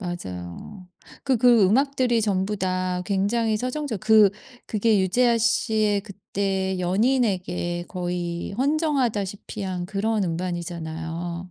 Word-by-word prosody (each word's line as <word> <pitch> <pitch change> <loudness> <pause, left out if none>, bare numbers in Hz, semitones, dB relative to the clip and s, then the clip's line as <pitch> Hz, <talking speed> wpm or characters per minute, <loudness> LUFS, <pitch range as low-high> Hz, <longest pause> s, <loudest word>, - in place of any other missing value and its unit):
맞아요. 175 - -7 0.4
그 265 -2 +2
그 235 -2 +5
음악들이 255 +1 +2
전부 200 0 0
다 185 -1 -1
굉장히 215 +3 +1
서정적 255 -3 -3
그 215 -1 +6 0.4
그게 215 -1 +2
유재하씨의 220 0 +2
그때 195 -2 -3
연인에게 180 -4 0
거의 175 -1 -3
헌정하다시피 245 - -1
한 180 -2 -3
그런 210 +1 0
음반이잖아요. 170 0 -4
195 Hz, 255 characters per minute, -24 LUFS, 180-230 Hz, 0.4 s, 그